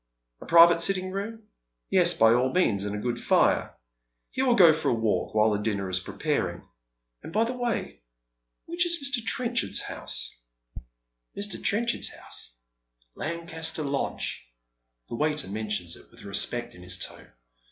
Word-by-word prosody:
A - - -11
private 170 0 +7
sitting 185 +1 +1
room? 220 +3 -5 0.5
Yes, 175 -2 +5
by 115 -6 +5
all 125 +2 +2
means, 100 - +1
and 105 0 -3
a - - -3
good 120 +2 -3
fire. - - +2 0.5
He 260 - -2
will 255 -2 +3
go 175 -7 +7
for 160 - -1
a - - +2
walk 110 -1 -1
while 110 0 +4
his 105 - -1
dinner 100 -3 -2
is 90 - +3
prepaiing. 90 - -2 0.6
And, - - -9
by 215 +4 +2
the 235 +2 -2
way, 240 - -3 0.6
which 345 +1 +1
is 340 0 +2
Mr. 275 -6 -1
Trenchard's 240 0 0
house? - - -2 1.0
♦♦Mr. 200 -1 -2
Trenchard's 235 +3 +1
house? - - -5 0.6
Lancaster 160 -1 -3
Lodge." 140 - -3 0.6
The - - -9
waiter 150 0 +1
mentions 105 -5 -3
it - - -16
with - - -15
respect 120 +4 -1
in 90 - -14
his 90 0 -4
tone. - - -8
160 Hz, 155 wpm, -27 LUFS, -, 1.0 s, private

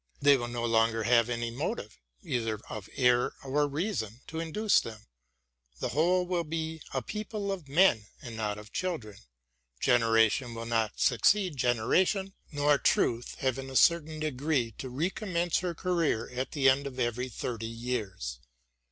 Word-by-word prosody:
They 145 0 +6
will 120 -3 -2
no 120 0 -3
longer 115 -1 +2
have 115 0 +4
any 120 -1 -2
motive, 115 - -4 0.2
either 115 -4 -2
of 105 -2 -7
error 125 -1 +3
or 145 +2 +1
reason, 140 - -3
to 160 - -6
induce 200 +6 +2
them. 110 -2 -8 0.7
The - - -2
whole 175 +7 +2
win 175 -3 -2
be 160 0 -3
a 130 -2 -2
people 210 - -4
of 180 -7 -5
men, 140 - +4
and 115 -2 -8
not 105 -2 -2
of 105 0 -12
children. 125 - -3 0.6
Generation 115 0 +3
will 115 0 -5
not 115 -3 -1
succeed 180 - +3
generation, 175 - +1 0.2
nor 145 -1 +3
truth 120 0 +1
have 130 -1 0
in 135 0 -6
a 135 - -8
certain 160 0 +3
degree 145 -4 0
to 130 - -5
recommence 175 - -1
her 175 -2 -3
career 165 -11 0
at 130 +1 -3
the 140 -3 +3
end 135 +1 +4
of 130 -1 -8
every 125 +1 -1
thirty 115 -1 -4
years. 110 - -4
130 Hz, 160 wpm, -29 LUFS, 115-160 Hz, 0.7 s, They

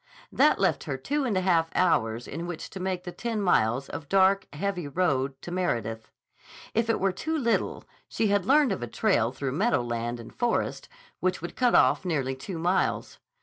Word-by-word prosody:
That - - +4
left - - +1
her - - -3
two 290 -1 -1
and 215 -6 0
a - - +2
half 170 -3 +2
hours 120 -10 +1
in 165 +4 -5
which 175 -2 -6
to 190 - -7
make 185 -1 -2
the 180 - -6
ten 225 +3 -3
miles 135 - +2
of 145 -3 -7
dark, 195 0 +4
heavy 180 +2 -3
road 140 -4 0
to 175 - -7
Meredith. 115 - -2 0.6
If 230 +1 +1
it 225 - +2
were 195 0 +2
too 315 - -3
little, 235 -6 0 0.3
she 225 - 0
had 200 -1 +2
learned 285 -3 +5
of 190 - -2
a 120 - -3
trail 120 - +1
through 135 0 -3
meadowland 120 - 0
and 115 - -11
forest 240 -1 -1 0.3
which 185 0 0
would 175 - -6
cut 245 -2 +3
off - - +4
nearly 140 -7 -1
two 170 +7 -6
miles. 175 +3 0
180 Hz, 190 wpm, -27 LUFS, 135-200 Hz, 0.6 s, learned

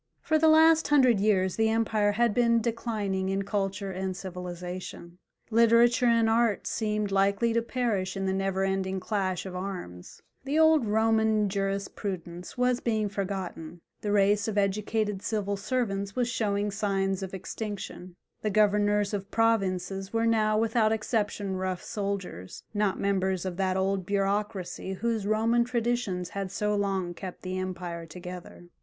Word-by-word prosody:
For 315 -1 +2
the 320 - +4
last 320 +1 +6
hundred 255 -7 +5
years 190 -3 +2
the 220 0 +3
empire 220 -2 +1
had 235 0 +2
been 235 0 +3
declining 215 -5 -2
in 195 +1 0
culture 195 0 -2
and 185 0 -3
civilization; 180 -1 -7 0.3
literature 235 +2 +5
and 230 -1 +4
art 225 -2 +2
seemed 210 -2 -1
likely 200 +4 +2
to 230 - +2
perish 225 -6 -1
in 195 - -2
the 190 - 0
never 195 0 0
ending 190 0 -1
clash 190 -2 -2
of 185 -1 -6
arms: 180 - -7 0.2
the 280 +3 -1
old 315 -6 +5
Roman 220 -1 +2
jurisprudence 195 -2 -4
was 250 0 +2
being 215 -3 0
forgotten, 185 -4 -5 0.2
the 205 - -2
race 205 +1 +3
of 215 -2 -2
educated 210 0 0
civil 205 -2 -1
servants 200 -3 -2
was 250 -1 +1
showing 205 -3 -1
signs 195 -1 -1
of 190 0 -5
extinction, 190 -2 -6 0.3
the 215 - 0
governors 205 0 +2
of 200 -1 -3
provinces 195 -4 0
were 230 0 +1
now 215 -2 +2
without 225 0 +2
exception 210 -3 -1
rough 185 -1 -3
soldiers, 195 - -5
not 205 -2 0
members 190 -2 0
of 185 -2 -3
that 190 -1 0
old 190 -1 0
bureaucracy 195 -2 -1
whose 220 0 -2
Roman 225 +3 +3
traditions 235 -7 -1
had 195 -2 -4
so 210 +1 0
long 195 -3 -1
kept 180 +1 -8
the 185 0 -3
empire 175 -2 -5
together. 180 +1 -9
200 Hz, 150 wpm, -28 LUFS, 190-225 Hz, 0.3 s, last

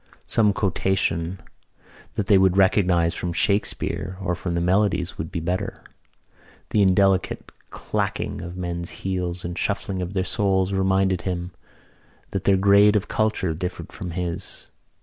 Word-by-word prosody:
Some 105 -2 +3
quotation 95 -3 0 0.8
that 105 - -1
they 100 -1 +5
would 95 0 +3
recognise 90 -3 +3
from 90 -1 -3
Shakespeare 95 -1 0
or 95 -2 -1
from 85 0 -3
the - - +1
Melodies 90 0 +1
would 80 - -4
be - - -2
better. 90 +3 -3 0.9
The 105 - +3
indelicate 95 0 +2 0.2
clacking - - -3
of 85 +1 -7
the - - -8
men's 85 -1 -4 0.2
heels 90 -2 -2
and 85 - -3
the 85 - -5
shuffling 100 -2 -2
of 90 +1 -4
their 95 - +1
soles 95 -1 +1
reminded 95 -1 +2
him 90 -1 -3 0.8
that 95 -1 -3
their 100 -1 +4
grade 100 +2 +5
of 105 - +1
culture 110 -6 0
differed 90 +2 -5
from 90 - -6
his. 90 +1 -5
95 Hz, 150 wpm, -23 LUFS, 90-100 Hz, 0.9 s, they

